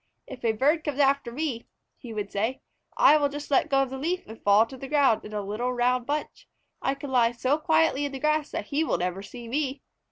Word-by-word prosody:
"If 255 -2 -10
a 225 -1 +2
bird 295 +8 +2
comes 295 -3 -3
after 275 -3 +2
me," 255 -3 -3 0.3
he 240 - -10
would 210 -2 -4
say, 225 +6 -2 0.4
"I 305 - +7
will 290 -1 +1
just 290 +1 -7
let 280 - +3
go 270 -1 +3
of 265 - -6
the 265 - -5
leaf 350 +6 -2
and 220 +1 -12
fall 205 +2 +5
to 265 - -11
the 270 +1 -8
ground 275 -6 +3
in 210 - -9
a 210 -1 -3
little 215 +5 -2
round 250 0 +1
bunch. 300 +1 -4 0.3
I 270 - 0
can 280 0 -8
lie 240 -2 +3
so 260 +5 0
quietly 315 -3 +2
in 285 - -3
the 270 - -5
grass 305 +1 +1
that - - -4
he 295 +3 +1
will 320 - 0
never 180 +2 -2
see 235 +4 -10
me." 270 +2 -2
265 Hz, 245 wpm, -26 LUFS, 230-290 Hz, 0.4 s, I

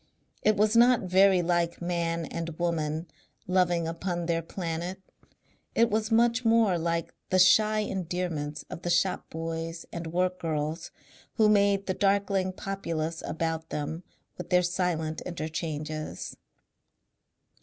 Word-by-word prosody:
It 215 -1 +3
was 215 +2 +3
not 240 +1 +6
very 185 0 +4
like 170 0 0
Man 170 -1 -1
and 165 0 -5
Woman 160 -2 -1 0.4
loving 175 -2 +2
upon 175 +1 -3
their 165 0 0
Planet; 170 +2 -4 0.8
it 230 -1 +4
was 215 +1 0
much 235 +2 +3
more 225 -6 +4
like 170 0 -1 0.2
the 185 - +3
shy 215 +4 +5
endearments 175 -6 -3
of - - -8
the 175 - -3
shop 175 +2 +1
boys 165 +1 -5
and 170 -1 -4
work 180 +2 0
girls 155 0 -2 0.5
who 220 -2 +4
made 200 -1 +3
the 185 - 0
darkling 195 -1 +1
populous 165 -4 -3
about 160 0 -2
them 150 +3 -3 0.4
with - - -6
their 180 -1 +4
silent 175 -3 -1
interchanges. 155 -2 -4
175 Hz, 130 wpm, -28 LUFS, 165-195 Hz, 0.8 s, not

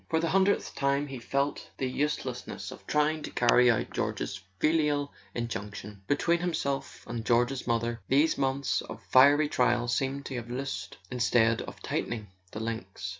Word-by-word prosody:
For 160 - +2
the 165 0 0
hundredth 195 +1 +2
time 140 +1 +1
he 135 -3 -7
felt 140 +4 -1
the 135 - -1
uselessness 145 +4 -3
of - - -12
trying 150 +1 +2
to - - -5
carry 125 0 +4
out 115 - +1
George's 100 - -2 0.2
filial 150 0 +1 0.2
injunction: 105 -3 -5
between 170 +4 +2
himself 155 -6 -2
and 115 -1 -4
George's 125 +3 +1
mother 115 -1 0
these 145 +4 +4
months 135 0 0
of - - -8
fiery 145 +3 +7
trial 120 -3 +2
seemed 135 +3 -1
to 130 - -5
have 120 -1 -6
loosed 120 -9 -4
instead 120 -2 +3
of - - -9
tightening 110 -4 -3 0.2
the - - -6
links. 110 -4 -4
130 Hz, 160 wpm, -29 LUFS, 115-145 Hz, 0.2 s, fiery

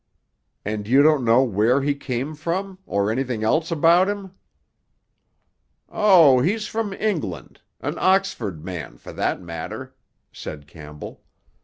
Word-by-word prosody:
"And 105 0 -3
you 135 +5 +5
don't 150 -3 +4
know 120 +3 +4
where 120 +4 +2
he 145 +1 +1
came 140 +1 -4
from? 185 +5 -4
Or 100 +1 0
anything 120 -2 -2
else 155 +9 +1
about 170 +3 +4
him?" 200 -2 -5 1.6
"Oh, 170 -11 +6
he's 210 - 0
from 220 -1 -3
England—an 150 - -4
Oxford 120 - 0
man, 80 -10 -7
for - - -11
that - - -1
matter," 85 -2 -7 0.4
said 75 -2 -8
Campbell. 75 0 -11
135 Hz, 125 wpm, -22 LUFS, -, 1.6 s, Oh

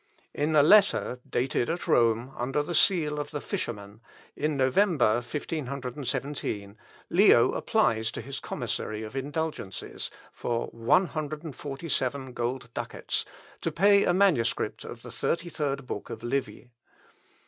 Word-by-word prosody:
In 155 +2 0
a 145 - +7
letter, 195 -8 +5
dated 120 -1 0
at 170 +2 -3
Rome, 115 +2 +3
under 135 +4 -1
the 175 - -4
seal 155 -6 +3
of 145 0 -4
the 150 -1 -4
Fisherman, 105 -5 -5 0.3
in 150 -1 -1
November, 130 - +3
1517, 130 -5 -4 0.4
Leo - - +6
applies 110 0 +1
to - - -6
his 140 0 -5
commissary 110 0 -3
of 110 +4 -8
indulgences 140 - -4 0.2
for 120 -1 -2
one 115 +12 +3
hundred 155 -1 -4
and 155 -5 -7
forty 145 +3 -6
seven 130 -2 -1
gold 120 0 -3
ducats, - - -3 0.4
to - - -1
pay 200 0 +5
a - - +3
manuscript 175 -11 +2
of - - -9
the - - -8
thirty 170 +1 -1
third 140 -4 -2
book 105 - -5
of - - -7
Livy. 125 0 -3
135 Hz, 140 wpm, -28 LUFS, 120-155 Hz, 0.4 s, a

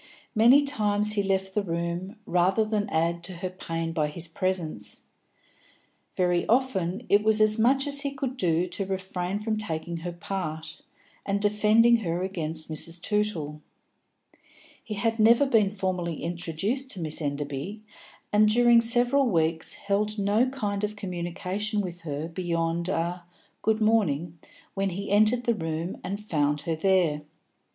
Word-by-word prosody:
Many 245 +6 +6
times 210 -6 +1
he 205 - +1
left 190 -1 -1
the 210 - +1
room, 170 +2 -3
rather 185 +5 +2
than 215 -1 -1
add 170 +1 0
to 185 - -7
her 185 +1 -4
pain 165 -2 -4
by 155 -2 +1
his 165 +3 -3
presence; 165 - -3 1.1
very 180 -1 +2
often 225 -4 0
it 205 - +4
was 220 0 +4
as 215 +1 +4
much 265 +5 +3
as 285 -1 +1
he 280 - -1
could 265 -2 -4
do 175 -7 +1
to 185 +2 -3
refrain 190 0 -3
from 215 +1 -2
taking 170 -4 -4
her 175 +2 -5
part, 165 -3 -5 0.4
and 200 0 -1
defending 215 +3 +4
her 175 -4 -2
against 165 -4 -2
Mrs. 165 +2 -2
Tootle. 170 -7 -1 1.2
He 215 - -5
had 225 +2 -1
never 235 +5 +6
been 225 -7 +3
formally 185 -5 -3
introduced 175 - -2
to 195 - -7
Miss 155 -1 -2
Enderby, 145 +8 -4 0.5
and 210 +1 +5
during 240 +1 +5
several 245 +4 +3
weeks 160 -3 0
held 210 +2 -1
no 205 +5 +2
kind 210 -6 -3
of 210 0 -2
communication 185 +3 -3
with 180 -3 -4
her 155 -1 -4
beyond 170 0 -2
a 175 -1 -2 0.4
"good 220 0 +1
morning" 175 -7 +1 0.3
when 195 0 0
he 195 +2 -5
entered 215 +4 +4
the 235 - +2
room 165 -2 -4
and 195 +2 -4
found 150 -8 0
her 165 +1 -2
there. 170 -3 +2
190 Hz, 150 wpm, -26 LUFS, 170-215 Hz, 1.2 s, Many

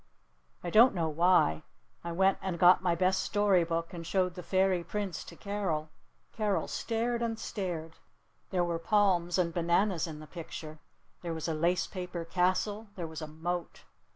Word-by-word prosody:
I 175 - -3
don't 230 +3 +7
know 165 -3 0
why. 155 - +3 0.4
I 170 - -4
went 190 +3 +2
and 185 -3 -3
got 180 +1 +6
my 175 -2 +1
best 185 +2 +2
story 205 -4 +3
book 165 +1 -3
and 170 -1 -6
showed 180 +1 0
the 180 - -7
Fairy 185 0 +1
Prince 195 -4 -4
to - - -11
Carol. 180 -7 -3 0.4
Carol 210 -3 0
stared 235 +1 -1
and 230 -1 -1
stared. 170 -7 -5 0.5
There 180 -2 +1
were 170 -1 -1
palms 175 -2 +2
and 170 -2 +1
bananas 175 +1 +1
in 155 -2 -7
the 155 - -9
picture. 155 -1 -8 0.4
There 170 -2 -4
was 160 - -4
a 165 - 0
lace 170 +3 +1
paper 180 -3 -5
castle. 185 +5 0
There 175 - -4
was 160 0 -7
a 155 - -5
moat. 170 +3 -4
175 Hz, 175 wpm, -30 LUFS, 165-195 Hz, 0.5 s, don't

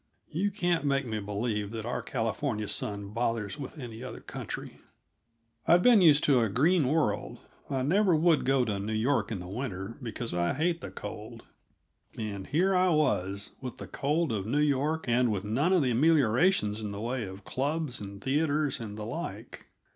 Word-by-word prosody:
(You 190 +6 0
can't 175 -5 0
make 140 -1 +1
me 110 -2 -3
believe 105 0 -2
that 110 0 -5
our 120 - -2
California 110 -2 -2
sun 100 -1 -3
bothers 115 +1 -2
with 140 +3 -7
any 120 -5 -8
other 130 - -7
country.) - - -7 0.9
I'd 175 +1 +6
been 240 -5 +7
used 150 -4 +6
to 135 -4 +5
a 115 -2 +2
green 150 - +3
world; 135 -8 0 0.3
I 135 -2 -1
never 185 +5 +3
would 160 0 +3
go 135 -1 +2
to 105 -3 -2
New 110 +2 -3
York 120 +3 +1
in 110 - -2
the 90 - -7
winter, 100 0 -5
because 115 -2 -4
I 85 +4 0
hate 170 +3 0
the - - -6
cold 110 +2 -8 0.7
and 100 -3 -5
here 180 +7 +2
I 185 0 +4
was, 100 - +1
with 125 -2 -6
the - - -7
cold 150 +1 0
of 105 -2 -2
New 140 - 0
York 150 +2 +1
and 120 0 +3
with 100 -2 -2
none 130 - +1
of 180 -5 +4
the 125 - +1
ameliorations 125 - +3
in 105 - -4
the 100 0 -6
way 120 +1 -2
of 95 +1 -10
clubs 145 -2 -1
and 100 0 -8
theaters 145 +3 0
and 105 -2 -7
the 105 - -5
like. - - -6
125 Hz, 185 wpm, -29 LUFS, 105-155 Hz, 0.9 s, been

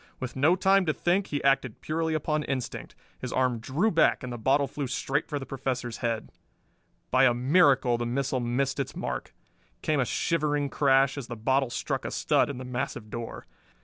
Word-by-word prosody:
With 130 -2 -5
no 150 +7 +4
time 190 0 +3
to 155 - +2
think, 185 +3 +1
he 145 - -3
acted 135 -4 +2
purely 160 0 -1
upon 155 0 0
instinct. 130 -3 -4 0.2
His 125 - -5
arm 125 -2 +1
drew 155 - 0
back 165 - +3
and 125 -1 -5
the - - -5
bottle 135 +5 +3
flew 140 0 -4
straight 140 +4 -1
for 150 - -3
the 135 - -5
Professor's 125 -3 -3
head. 115 -2 -2 0.8
By 130 +1 +5
a 120 -2 +4
miracle 135 -2 +4
the 120 - -2
missile 130 +1 -1
missed 135 +3 -1
its 140 - -3
mark. - - -4 0.5
Came 155 -2 +1
a 130 - +2
shivering 150 -1 0
crash, 135 0 +3
as 125 - -7
the 120 - -5
bottle 130 +4 +1
struck - - -3
a - - -3
stud - - +2
in 140 - -5
the 130 - -7
massive 120 -3 -4
door. 115 -1 -6
135 Hz, 195 wpm, -27 LUFS, 125-145 Hz, 0.8 s, By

